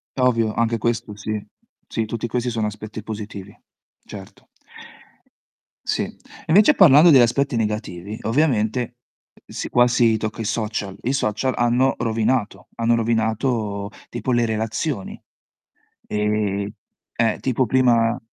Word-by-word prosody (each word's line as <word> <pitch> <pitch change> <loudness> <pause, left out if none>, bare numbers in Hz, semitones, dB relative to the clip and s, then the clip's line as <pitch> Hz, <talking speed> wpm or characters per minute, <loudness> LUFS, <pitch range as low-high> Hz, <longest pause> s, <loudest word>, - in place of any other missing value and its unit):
Ovvio 115 -4 +2
anche 115 +1 0
questo 115 -1 -2
sì. 105 0 -4 0.4
Sì, 110 - -1
tutti 115 +1 -4
questi 125 +1 -2
sono 110 -2 -1
aspetti 110 +1 -7
positivi, 105 -2 -8 0.5
certo. 95 -2 -12 1.4
Sì. - - 0
E - - -8 0.3
invece 205 - +6
parlando 165 - +7
degli 135 -4 +7
aspetti 125 +3 +1
negativi, 105 -3 -3
ovviamente, 120 -2 0 0.5
si - - -6
qua 120 0 +4
si 115 -2 +3
tocca 110 +1 -4
i - - -2
social: 110 -3 -3
i 130 - 0
social 130 0 0
hanno 120 +3 +2
rovinato, 115 0 -1
hanno 115 0 +2
rovinato 110 -2 -1 0.2
tipo 120 +2 -3
le 120 -1 +2
relazioni, 110 - -3 0.9
ehm, 105 -1 -1 0.5
eh, 115 -2 +1
tipo 130 0 0
prima 120 -1 +2
115 Hz, 125 wpm, -22 LUFS, 105-120 Hz, 1.4 s, parlando